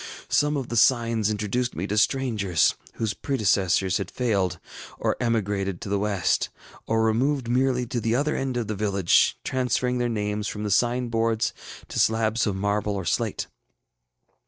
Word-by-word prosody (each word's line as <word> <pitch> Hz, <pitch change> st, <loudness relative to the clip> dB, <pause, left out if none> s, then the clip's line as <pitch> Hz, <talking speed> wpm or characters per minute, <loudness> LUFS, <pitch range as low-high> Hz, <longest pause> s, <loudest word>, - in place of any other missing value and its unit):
Some 150 Hz, 0 st, +2 dB
of 135 Hz, -3 st, -4 dB
the 120 Hz, -, -2 dB
signs 115 Hz, -2 st, +3 dB
introduced 110 Hz, +4 st, -1 dB
me 85 Hz, -, -3 dB
to 105 Hz, -, -2 dB
strangers, 105 Hz, -, +2 dB, 0.2 s
whose 110 Hz, -2 st, -2 dB
predecessors 95 Hz, -7 st, +1 dB
had 100 Hz, -1 st, -4 dB
failed, 100 Hz, -8 st, 0 dB, 0.4 s
or -, -, 0 dB
emigrated 100 Hz, -5 st, -1 dB
to -, -, -6 dB
the 100 Hz, 0 st, +1 dB
West, 100 Hz, -3 st, 0 dB, 0.4 s
or 110 Hz, 0 st, +2 dB
removed 125 Hz, +4 st, +1 dB
merely 125 Hz, 0 st, +1 dB
to 120 Hz, 0 st, -3 dB
the 115 Hz, +1 st, +1 dB
other 150 Hz, +4 st, 0 dB
end 130 Hz, -2 st, -2 dB
of 120 Hz, -, -1 dB
the 105 Hz, -, -3 dB
village, 100 Hz, -3 st, +2 dB
transferring 125 Hz, -1 st, 0 dB
their 120 Hz, 0 st, 0 dB
names 105 Hz, -1 st, -2 dB
from 105 Hz, -, -4 dB
the 105 Hz, -, -2 dB
sign 120 Hz, +4 st, +2 dB
boards 115 Hz, -1 st, 0 dB, 0.3 s
to -, -, -3 dB
slabs 110 Hz, 0 st, +2 dB
of 100 Hz, -, -1 dB
marble 100 Hz, +1 st, -1 dB
or 95 Hz, -2 st, -4 dB
slate. 105 Hz, +6 st, -1 dB
110 Hz, 165 wpm, -25 LUFS, 100-125 Hz, 0.4 s, signs